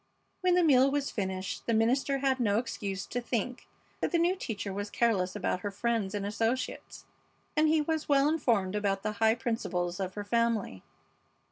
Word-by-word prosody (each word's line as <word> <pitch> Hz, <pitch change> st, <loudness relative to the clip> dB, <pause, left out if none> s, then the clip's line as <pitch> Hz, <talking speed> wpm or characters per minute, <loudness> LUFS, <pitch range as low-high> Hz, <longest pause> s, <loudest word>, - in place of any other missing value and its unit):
When 365 Hz, -1 st, +3 dB
the 360 Hz, -, +4 dB
meal 270 Hz, -4 st, +5 dB
was 280 Hz, 0 st, -1 dB
finished 190 Hz, -2 st, -4 dB
the 230 Hz, -, +2 dB
minister 255 Hz, +5 st, +2 dB
had 265 Hz, -1 st, +1 dB
no 210 Hz, -4 st, +2 dB
excuse 200 Hz, -5 st, -3 dB
to 245 Hz, -, -3 dB
think 245 Hz, +1 st, -3 dB, 0.3 s
that -, -, -1 dB
the 345 Hz, -, +3 dB
new 345 Hz, +2 st, +2 dB
teacher 210 Hz, -, -4 dB
was 205 Hz, +1 st, -4 dB
careless 200 Hz, -6 st, +1 dB
about 185 Hz, -2 st, -1 dB
her 205 Hz, -, -3 dB
friends 210 Hz, -1 st, -1 dB
and 200 Hz, -1 st, -2 dB
associates, 225 Hz, +5 st, -2 dB, 0.5 s
and 310 Hz, 0 st, +4 dB
he 310 Hz, 0 st, +3 dB
was 315 Hz, 0 st, -2 dB
well 280 Hz, 0 st, +4 dB
informed 235 Hz, -12 st, +1 dB
about 200 Hz, -2 st, -1 dB
the 215 Hz, -, -1 dB
high 220 Hz, 0 st, +5 dB
principles 185 Hz, -7 st, -2 dB
of 185 Hz, -1 st, -3 dB
her 205 Hz, -1 st, -5 dB
family. 230 Hz, -, 0 dB
225 Hz, 180 wpm, -30 LUFS, 200-270 Hz, 0.5 s, meal